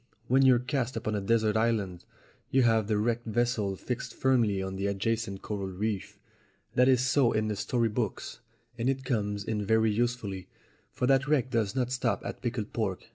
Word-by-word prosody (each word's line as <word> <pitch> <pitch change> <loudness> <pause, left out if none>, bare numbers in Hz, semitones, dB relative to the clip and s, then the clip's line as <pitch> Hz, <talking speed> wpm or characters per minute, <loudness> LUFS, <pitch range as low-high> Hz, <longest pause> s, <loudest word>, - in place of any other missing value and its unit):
When 130 +2 +4
you're 130 -2 +6
cast 125 0 -2
upon 110 -1 -2
a 105 - -1
desert 110 +1 +2
island 110 -6 0 0.4
you 135 -1 +3
have 110 -3 +3
the 110 -2 +1
wrecked 115 +2 -1
vessel 110 -3 0
fixed 125 +5 -5
firmly 120 -7 +2
on 95 0 -4
the 100 +1 -1
adjacent 100 0 -2
coral 100 -2 -3
reef. 100 +1 -3 0.6
That 125 +1 +4
is 130 -1 +4
so 130 -2 +3
in 110 0 0
the 105 - -1
story 115 +3 0
books, 110 -1 -3 0.4
and 120 +3 +1
it 135 -1 -2
comes 105 -5 -1
in 105 0 -2
very 110 +1 +3
usefully, 110 -4 -2 0.4
for - - -1
that 135 +2 +3
wreck 135 -4 +1
does 110 -5 0
not 125 -2 0
stop 125 -5 -1
at - - -6
pickled 120 -4 -3
pork. 100 -5 -3
115 Hz, 185 wpm, -29 LUFS, 105-125 Hz, 0.6 s, you're